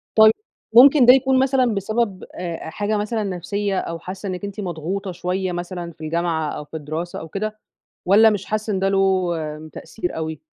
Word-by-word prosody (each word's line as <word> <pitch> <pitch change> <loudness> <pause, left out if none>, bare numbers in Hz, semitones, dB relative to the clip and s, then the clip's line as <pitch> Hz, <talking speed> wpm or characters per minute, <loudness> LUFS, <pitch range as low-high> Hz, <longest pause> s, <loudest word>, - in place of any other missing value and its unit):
طيب، 220 0 +8 0.4
ممكن 265 +2 +8
ده 250 - +9
يكون 265 0 +3
مثلًا 260 -3 +2
بسبب 205 0 -1
آآ 170 -2 -6
آآ - - -5
حاجة 205 +6 -1
مثلًا 215 +1 -1
نفسيّة، 195 +1 -2
أو 165 0 -5
حاسّة 190 +2 -7
إنِّك 185 +1 -4
أنتِ 200 +1 -7
مضغوطة 185 +2 -4
شوية 180 +1 -2
مثلًا 175 0 -5
في 160 -1 -20
الجامعة 160 -1 -1
أو 150 - -7
في 160 - -7
الدراسة 155 +4 -5
أو 160 - -8
كده، 215 +4 -4 0.5
والّا 210 +5 +6
مش 205 -3 -2
حاسّة 215 0 -2
إن 190 - 0
ده 195 - +1
له 190 -2 +2 0.4
تأثير 180 -5 -5
أوي؟ 160 0 -4
195 Hz, 190 wpm, -21 LUFS, 175-215 Hz, 0.5 s, ده